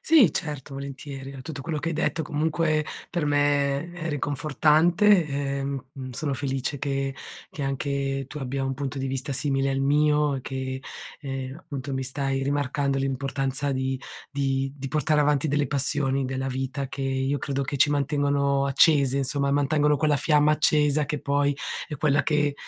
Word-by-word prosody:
Sì, 285 - +5
certo, 145 -2 -4
volentieri. 135 0 -7
Tutto 140 -3 -6
quello 155 +3 -2
che 150 +3 -2
hai - - -2
detto 160 +1 0
comunque 155 +1 0 0.2
per 175 -3 -1
me 145 +2 +1
è 170 -2 -5
ri 145 -2 -1
confortante, 155 +7 +3
ehm, 140 -1 -2 0.3
sono 140 +3 -2
felice 135 +1 -2
che 135 0 -2 0.4
che 145 - -6
anche 135 0 -1
tu 150 - -7
abbia 135 0 -2
un 135 0 -1
punto 140 0 -4
di 135 - -2
vista 135 +1 -3
simile 135 0 0
al 135 - 0
mio 150 +1 +3
e - - -4
che, 130 0 -4 0.4
ehm, 135 -2 -5
appunto, 140 -5 -6
mi 130 - -1
stai 135 +1 -1
rimarcando 140 0 0
l'importanza 135 +1 -1
di 130 0 -1 0.3
di 135 -1 -1
di 135 -1 -5
portare 150 +1 +2
avanti 145 0 +2
delle 145 0 +1
passioni 135 -1 +1
della 130 +1 -2
vita, 135 +1 -3
che 135 +1 -5
io 135 +1 0
credo 140 +1 -2
che 140 +2 -3
ci 140 - +5
mantengono 140 -1 +1
accese, 140 -1 +4
insomma, 140 +1 0
mantengono 145 +1 +3
quella 150 +1 +2
fiamma 150 +1 +3
accesa 150 -1 +3
che 145 +1 -3
poi 140 0 +1 0.3
è 150 - -6
quella 145 0 +2
che 150 -2 +1
140 Hz, 165 wpm, -26 LUFS, 135-150 Hz, 0.4 s, Sì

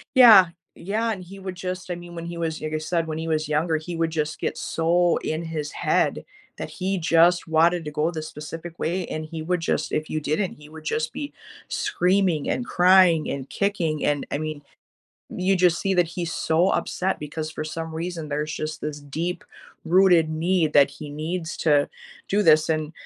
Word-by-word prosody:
Yeah, 220 -8 +9 0.3
yeah, 220 +5 -2
and 190 - -6
he 195 +3 -11
would 190 -1 -6
just 185 0 -5
I - - 0
mean, 175 0 -10
when 170 0 -6
he 170 0 -6
was 165 -1 -3
like 155 0 -4
I - - +1
said, 165 +1 -1
when 155 0 -4
he 165 0 -4
was 155 -1 0
younger, 160 +2 +1
he 165 +2 -5
would 165 0 0
just 155 -1 -2
get - - -2
so 170 +1 +2
in 155 +2 -3
his 155 -3 -4
head - - 0 0.3
that - - -5
he 190 +1 -2
just 170 +1 +3
wanted 165 +1 +3
to - - -3
go 150 +2 0
this 155 -2 -5
specific 165 +2 -8
way, 175 +2 -1
and 155 0 -4
he 160 0 -6
would 180 +2 -1
just 165 - -1
if 155 0 -2
you 155 - -1
didn't, 155 +6 -1
he 150 0 -15
would 155 0 -12
just 155 0 -1
be 290 0 -6 0.4
screaming 180 -4 +1
and 245 - -2
crying 180 -3 +5
and 135 -1 -5
kicking 175 -7 -1
and, 145 -1 0
I - - -1
mean, 155 -1 -5 0.7
you 190 +1 +1
just 175 -1 +3
see 195 - 0
that 175 -2 +3
he's 170 0 -4
so 170 +4 +2
upset 190 +1 -1
because 155 +1 -5
for 155 - -5
some 160 +1 -5
reason, 165 -1 -4
there's 150 +1 -2
just 155 0 -4
this 150 -1 -5
deep 160 +5 -4 0.4
rooted 175 -2 +4
need 160 0 +1
that 140 -1 +6
he 145 +1 -9
needs 160 +3 -4
to 145 -3 +3 0.4
do 205 +1 +2
this 155 -2 +5
and, 155 0 -1
165 Hz, 205 wpm, -24 LUFS, 155-180 Hz, 0.7 s, Yeah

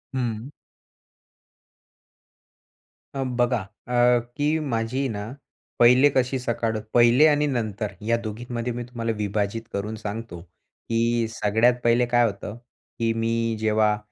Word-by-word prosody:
हं. 120 -1 -3 2.7
अ, 135 - -1
बघा, 120 -1 +1 0.3
अ, 120 0 +4 0.2
की 150 +2 +1
माझी 115 +4 -1
ना, 105 +1 -5 0.5
पहिले 125 +4 +6
कशी 130 +1 +1
सकाळ 115 -2 -1 0.2
पहिले 120 +5 +6
आणि 150 -1 +3
नंतर 110 -5 -2 0.2
या 115 0 +3
दोघींमध्ये 120 +2 -4
मी 120 - -4
तुम्हाला 115 -1 -3
विभाजित 105 +1 -1
करून 105 +2 -3
सांगतो, 110 -4 -6
की 115 +6 -2
सगळ्यात 110 +3 +2
पहिले 120 +1 +3
काय 120 0 +3
होतं, 105 +1 -4 0.4
की 115 -1 +1
मी 115 0 0
जेव्हा 110 -1 +2
115 Hz, 120 wpm, -24 LUFS, 110-125 Hz, 2.7 s, पहिले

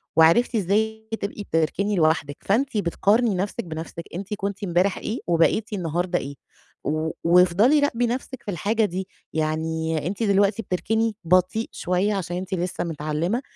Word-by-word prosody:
وعرفتِ 170 +10 +5
إزاي 220 +2 0
بتبقي 205 -1 -4
تركني 180 +6 +1
لوحدِك، 155 -4 +1
فأنتِ 230 +4 +1
بتقارني 205 +4 +2
نَفْسِك 205 +5 -2
بنَفْسِك، 165 0 -6
أنتِ 195 +3 -5
كنتِ 200 0 -4
امبارح 180 +1 +1
إيه 225 - -3
وبقيتِ 175 +6 +2
النهارده 175 0 -1
إيه، 140 +1 -7 0.5
و 155 +1 -1
وافضلي 180 - +5
راقبي 245 -4 +1
نَفْسِك 255 +1 -4
في 205 - -4
الحاجة 210 +6 +1
دي، 185 0 -4 0.3
يعني 160 0 -1
أنتِ 200 +5 -2
دلوقتي 200 +2 +3
بتركني 220 +4 0
بطيء 185 +6 +2
شوية 185 +4 0
عشان 180 -3 -3
أنتِ 190 +1 -5
لسه 180 0 -2
متعلمة، 165 - -2
185 Hz, 145 wpm, -24 LUFS, 165-215 Hz, 0.5 s, وعرفتِ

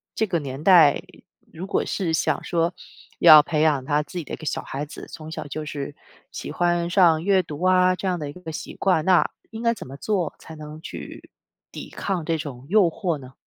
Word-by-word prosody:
这 220 - +1
个 175 -3 0
年 140 0 -7
代， 165 -6 +6 0.5
如 175 +4 -7
果 - - 0
是 175 -5 -2
想 160 - 0
说 170 0 0 0.5
要 155 -1 +10
培 155 -1 -1
养 150 -4 +2
他 145 +2 +1
自 150 +5 -10
己 170 - -3
的 - - -9
一 - - -3
个 - - -10
小 - - -2
孩 140 +2 -5
子 150 - -10
从 155 0 -9
小 160 - -6
就 155 +2 -5
是 145 -1 -6 0.4
喜 - - -6
欢 175 -1 0
上 170 -4 +4
阅 195 0 +3
读 155 0 -7
啊 185 0 +4
这 190 - -4
样 180 -2 -1
的 150 -2 -5
一 - - -8
个 180 -2 -8
习 155 - -7
惯， 185 -5 +1
那 185 -2 +4 0.2
应 225 0 -7
该 230 0 +3
怎 225 - -10
么 135 +2 -9
做 185 -2 -1
才 160 - -11
能 150 0 -9
去 190 - -9 0.4
抵 - - -8
抗 190 -4 -3
这 165 0 0
种 135 -5 -7
诱 210 +2 +5
惑 175 -3 -2
呢？ 130 -2 -13
165 Hz, 240 characters per minute, -23 LUFS, 150-180 Hz, 0.5 s, 要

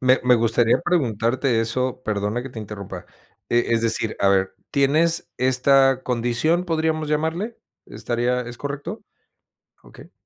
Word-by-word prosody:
Me 130 0 +4
me 125 0 +6
gustaría 115 0 +2
preguntarte 120 - +1
eso. 125 +3 -2
Perdona 105 +3 -2
que 135 - -8
te 120 - -9
interrumpa. 100 -4 -8 0.4
E 120 0 +1
es 115 0 +1
decir, 115 -1 0
a 100 - +4
ver, 95 -1 +1 0.2
tienes 155 +4 +2
esta, 130 +1 +3
¿condición, 125 +8 0
podríamos 160 -2 -1
llamarle? 160 +9 -2 0.3
¿Estaría 120 +3 -1
es 120 0 -7
correcto? 145 +9 -6 0.8
Okey. - - -15
125 Hz, 135 wpm, -22 LUFS, 115-145 Hz, 0.8 s, me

